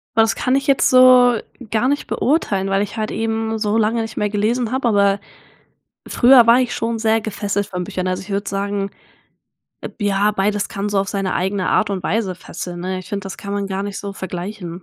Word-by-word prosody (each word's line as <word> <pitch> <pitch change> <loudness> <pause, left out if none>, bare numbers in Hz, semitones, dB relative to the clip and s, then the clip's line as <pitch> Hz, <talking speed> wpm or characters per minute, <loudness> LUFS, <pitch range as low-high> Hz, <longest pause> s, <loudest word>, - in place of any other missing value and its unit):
Das 225 0 +3
kann 255 +1 0
ich 275 +1 -1
jetzt 275 - +3
so 255 -2 +6 0.3
gar 225 +3 +1
nicht 285 +1 -1
beurteilen, 205 - 0
weil 195 +1 +1
ich 205 +2 -4
halt 215 0 -2
eben 225 0 -2
so 215 0 0
lange 225 +1 +1
nicht 225 0 -6
mehr 210 - 0
gelesen 220 +3 0
habe, 260 -2 +1
aber 200 -2 +3 0.9
früher 245 -2 +6
war 240 +2 +7
ich 250 - -1
schon 230 0 -2
sehr 220 0 +2
gefesselt 205 -1 -2
von 180 -3 -4
Büchern. 185 +1 -3
Also, 185 0 -2
ich 205 - -13
würde 200 +1 -2
sagen, 200 0 -2 0.9
eb - - -8
ja, 205 +1 +2
beides 205 0 0
kann 200 +1 -4
so 205 - +1
auf 195 0 -1
seine 195 -2 -2
eigene 190 +1 -1
Art 215 - +2
und 195 -3 -3
Weise 200 -3 -1
fesseln, 175 0 -7
ne? 185 +1 -3
Ich 185 - -10
finde, 200 -1 -4
das 195 - -7
kann 200 0 -5
man 200 -1 -2
gar 195 0 -3
nicht 200 -1 -5
so 200 -1 -6
vergleichen. 180 -1 -6
205 Hz, 215 wpm, -19 LUFS, 195-225 Hz, 0.9 s, war